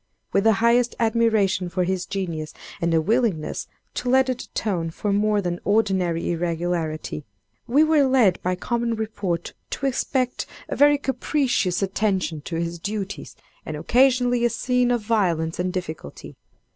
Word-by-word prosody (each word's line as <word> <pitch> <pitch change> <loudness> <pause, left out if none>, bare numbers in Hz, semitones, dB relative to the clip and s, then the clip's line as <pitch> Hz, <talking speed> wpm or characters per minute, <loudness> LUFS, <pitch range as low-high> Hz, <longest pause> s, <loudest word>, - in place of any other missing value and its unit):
With 200 +2 +2
the 225 - +6
highest 235 +3 +2
admiration 220 -5 +2
for 180 +1 0
his 180 0 -2
genius, 170 -6 -4 0.3
and 170 0 +1
a 165 - +4
willingness 210 -3 0 0.3
to 250 - -3
let 260 +1 +4
it 255 -1 -3
atone 175 -6 -2
for 200 +5 -2
more 210 0 +2
than 175 -1 -2
ordinary 190 -6 +1
irregularity, 165 -3 -2 0.4
we 280 +6 +5
were 310 -3 +4
led 250 -9 +3
by 180 0 0
common 235 +4 -1
report 205 -6 -3 0.2
to 275 - -4
expect 255 -1 -1 0.2
a - - -3
very 290 0 +5
capricious 265 - 0
attention 190 -5 -1
to 170 - -4
his 170 +1 -3
duties, 200 +1 -5 0.3
and 155 - -5
occasionally 245 - +3
a 240 - +4
scene 250 0 +1
of 240 -2 +1
violence 175 -7 0
and 180 +1 0
difficulty. 160 - -6
200 Hz, 150 wpm, -23 LUFS, 175-240 Hz, 0.4 s, the